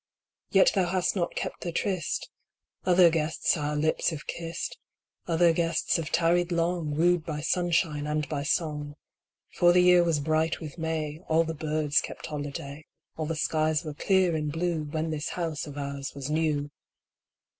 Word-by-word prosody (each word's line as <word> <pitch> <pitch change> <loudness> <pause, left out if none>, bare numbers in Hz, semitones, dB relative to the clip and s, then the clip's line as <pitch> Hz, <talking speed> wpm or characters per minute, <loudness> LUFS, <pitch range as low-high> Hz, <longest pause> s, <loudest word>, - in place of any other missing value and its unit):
Yet - - +5
thou 180 - +2
hast 185 +2 0
not 175 -3 -1
kept - - -4
the 175 - -3
tryst. 180 -2 -2 0.5
Other 180 -2 +6
guests 160 -1 +1
our 150 -2 -2
lips 155 +2 +1
have 160 -3 -6
kissed: 170 - -5 0.5
Other 170 0 +4
guests 165 0 +1
have 160 -2 -4
tarried 175 +1 +2
long, 170 -3 0
Wooed 175 +1 +3
by 150 -1 -4
sunshine 165 -3 0
and 150 0 -1
by 145 -2 -3
song; 150 -1 -1 0.6
For 175 0 +5
the 180 0 +5
year 180 -1 +6
was 165 -3 +1
bright 160 +2 0
with 155 +1 -8
May, 160 -2 -2
All 160 +1 +3
the 165 0 -4
birds 155 -1 +1
kept - - -8
holiday, 145 0 -6 0.3
All 155 -1 -3
the 165 - -2
skies 155 +1 +1
were 155 - -4
clear 185 +2 +2
and 150 -1 -1
blue, 165 -1 -1
When 155 +2 -2
this 155 0 -3
house 165 -4 -3
of 145 -1 -9
ours 140 -1 -4
was 140 +1 -5
new. 150 -2 0
160 Hz, 170 wpm, -27 LUFS, 150-170 Hz, 0.6 s, Other